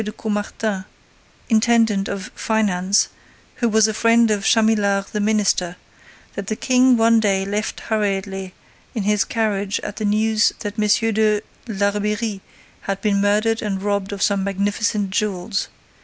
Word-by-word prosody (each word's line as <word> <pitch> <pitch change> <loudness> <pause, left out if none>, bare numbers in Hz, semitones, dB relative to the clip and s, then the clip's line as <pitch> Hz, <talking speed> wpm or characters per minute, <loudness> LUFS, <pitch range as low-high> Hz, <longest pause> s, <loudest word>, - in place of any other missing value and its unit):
de 210 - -5
Caumartin, 210 -2 -3 0.6
intendant 225 -3 +2
of 195 -1 -5
finance, 200 -3 +1 0.5
who 235 - +1
was 220 0 +4
a 220 - -2
friend 230 +1 +3
of 205 -2 0
Chamillard 205 -3 +2
the 210 - -2
minister, 205 -4 +1 0.6
that 200 -1 -6
the 215 - -1
King 255 +1 +3
one 230 0 +4
day 195 -3 +1
left 205 +2 -3
hurriedly 195 -3 -2 0.4
in 220 - -1
his 210 0 +2
carriage 210 -6 -1
at 205 - -7
the 215 - -2
news 215 +1 +2
that 205 0 -5
M. 215 +1 +2
de 215 -1 +2 0.3
Larbeyrie 210 0 -1 0.4
had 195 0 -3
been 200 -2 +1
murdered 215 +2 +1
and 200 -3 -2
robbed 200 -1 -1
of 200 -1 -3
some 200 -2 +1
magnificent 200 +1 -1
jewels. 195 -1 -2
210 Hz, 145 wpm, -20 LUFS, 200-220 Hz, 0.6 s, was